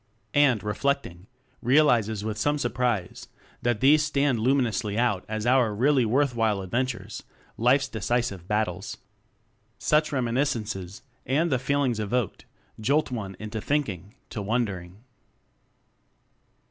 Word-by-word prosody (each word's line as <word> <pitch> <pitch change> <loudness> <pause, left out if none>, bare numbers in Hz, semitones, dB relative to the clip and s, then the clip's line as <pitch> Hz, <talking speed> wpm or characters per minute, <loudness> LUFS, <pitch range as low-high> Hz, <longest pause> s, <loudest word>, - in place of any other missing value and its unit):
And, 135 -7 +4
reflecting, 105 -5 -2 0.3
realizes 120 -6 +3
with 110 -1 -3
some 145 +6 +1
surprise 120 -7 -2 0.3
that 120 -3 0
these 150 +3 +6
stand 140 -4 +1
luminously 115 -4 +1
out 115 -6 +1
as 110 0 -3
our 120 -4 +3
really 130 +2 +3
worth 130 +4 +2
while 110 -4 0
adventures 120 +5 -3 0.3
life's 130 +4 +3
decisive 110 -5 -2
bat 105 +1 +2
tles. - - -7 0.8
Such 155 0 +2
reminiscences, 115 -8 -2 0.2
and 155 +5 +1
the 130 - +2
feelings 135 -3 0
evoked, 110 +1 -2 0.3
jolt 140 +6 +1
one 100 -6 -4
into 110 0 -5
thinking 105 - -2 0.2
to 105 - -4
wondering. 100 -3 -3
120 Hz, 120 wpm, -26 LUFS, 105-135 Hz, 0.8 s, these